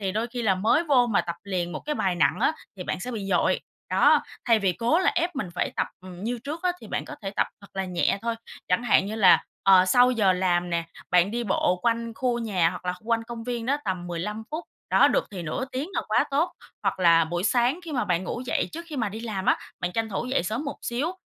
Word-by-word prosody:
thì 190 Hz, -2 st, -1 dB
đôi 220 Hz, +3 st, -1 dB
khi 240 Hz, 0 st, -5 dB
là 200 Hz, -4 st, +3 dB
mới 220 Hz, -, +2 dB
vô 265 Hz, -6 st, +4 dB
mà 225 Hz, -, +2 dB
tập 170 Hz, -1 st, -5 dB
liền 180 Hz, -3 st, -2 dB
một -, -, -5 dB
cái 300 Hz, -, -1 dB
bài 190 Hz, -9 st, 0 dB
nặng 165 Hz, -, +2 dB
á, -, -, +3 dB, 0.2 s
thì 180 Hz, -, -5 dB
bạn -, -, -3 dB
sẽ 250 Hz, -, -4 dB
bị 215 Hz, -5 st, -4 dB
dội. -, -, +2 dB, 0.3 s
Đó, -, -, +5 dB, 0.2 s
thay 230 Hz, -2 st, +4 dB
vì 195 Hz, -3 st, +1 dB
cố 240 Hz, -, +2 dB
là 375 Hz, -, +3 dB
ép 340 Hz, -1 st, 0 dB
mình 210 Hz, -8 st, -2 dB
phải -, -, -1 dB
tập, -, -, +1 dB
ừm, 185 Hz, 0 st, -9 dB
như 240 Hz, +2 st, -2 dB
trước 310 Hz, +4 st, -5 dB
á, 365 Hz, -1 st, +2 dB
thì -, -, -10 dB
bạn -, -, -3 dB
có -, -, -8 dB
thể 195 Hz, -, -3 dB
tập -, -, +1 dB
thật 200 Hz, -, -13 dB
là 195 Hz, 0 st, -1 dB
nhẹ 180 Hz, +1 st, 0 dB
thôi. 230 Hz, 0 st, -1 dB, 0.3 s
Chẳng 180 Hz, +6 st, +2 dB
hạn 215 Hz, -4 st, +4 dB
như 210 Hz, -, -4 dB
là, 200 Hz, -5 st, +6 dB, 0.2 s
ờ, 190 Hz, -1 st, +7 dB
sau 245 Hz, +7 st, +5 dB
giờ 210 Hz, -6 st, +3 dB
làm 180 Hz, -1 st, +1 dB
nè, 170 Hz, -1 st, 0 dB, 0.3 s
bạn 180 Hz, +2 st, +4 dB
đi 235 Hz, +1 st, -2 dB
bộ 185 Hz, -2 st, +1 dB
quanh 230 Hz, 0 st, 0 dB
khu 245 Hz, 0 st, 0 dB
nhà 190 Hz, -8 st, +1 dB
hoặc -, -, -8 dB
là 180 Hz, -, 0 dB
kh 215 Hz, +5 st, -14 dB
quanh 230 Hz, 0 st, +2 dB
công 230 Hz, -1 st, -7 dB
viên 240 Hz, -2 st, -3 dB
đó 280 Hz, +3 st, +2 dB
tầm 185 Hz, -2 st, -2 dB
15 180 Hz, +6 st, -4 dB
phút, 315 Hz, +3 st, -4 dB, 0.3 s
đó, -, -, +6 dB
được -, -, +1 dB
thì 185 Hz, -3 st, -6 dB
nửa 165 Hz, +10 st, -3 dB
tiếng 270 Hz, +6 st, -3 dB
là -, -, 0 dB
quá -, -, +3 dB
tốt. 315 Hz, +6 st, +1 dB, 0.3 s
Hoặc -, -, 0 dB
là 165 Hz, -2 st, +6 dB
buổi 175 Hz, +3 st, -3 dB
sáng 245 Hz, -, +2 dB
khi 325 Hz, -, -6 dB
mà 255 Hz, -, 0 dB
bạn 180 Hz, 0 st, 0 dB
ngủ 240 Hz, -, -4 dB
dậy -, -, 0 dB
trước 335 Hz, +2 st, -6 dB
khi 305 Hz, -, -6 dB
mà 230 Hz, -5 st, 0 dB
đi 215 Hz, +3 st, -7 dB
làm 215 Hz, -5 st, -4 dB
á, -, -, +5 dB, 0.2 s
bạn 180 Hz, 0 st, -2 dB
tranh 225 Hz, +1 st, -1 dB
thủ 205 Hz, +2 st, -3 dB
dậy 255 Hz, -6 st, +1 dB
sớm 220 Hz, -, -3 dB
một 285 Hz, -, -4 dB
xíu 275 Hz, +9 st, -1 dB
220 Hz, 270 wpm, -26 LUFS, 185-245 Hz, 0.3 s, ờ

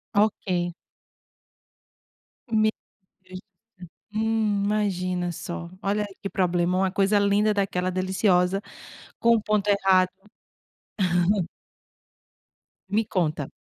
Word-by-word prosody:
Ok. 185 Hz, -4 st, +1 dB, 1.8 s
Meu 215 Hz, -1 st, +3 dB, 0.5 s
Deus 185 Hz, 0 st, -9 dB
do 200 Hz, +1 st, -29 dB
céu, -, -, -21 dB, 0.3 s
hum, 220 Hz, -2 st, +1 dB
imagina 185 Hz, -4 st, -1 dB
só, 170 Hz, +1 st, -6 dB
olha 205 Hz, +1 st, 0 dB, 0.2 s
que 195 Hz, -, -2 dB
problema, 180 Hz, 0 st, +1 dB
uma 190 Hz, 0 st, +2 dB
coisa 200 Hz, +1 st, +3 dB
linda 205 Hz, +1 st, +3 dB
daquela 190 Hz, -2 st, 0 dB
deliciosa 185 Hz, 0 st, +1 dB, 0.6 s
com 235 Hz, 0 st, +4 dB
o 215 Hz, -, -2 dB
ponto 210 Hz, -1 st, 0 dB
errado. 190 Hz, -2 st, +4 dB, 2.8 s
Me 215 Hz, +3 st, +1 dB
conta. 155 Hz, -7 st, -1 dB
195 Hz, 95 wpm, -25 LUFS, 180-210 Hz, 2.8 s, com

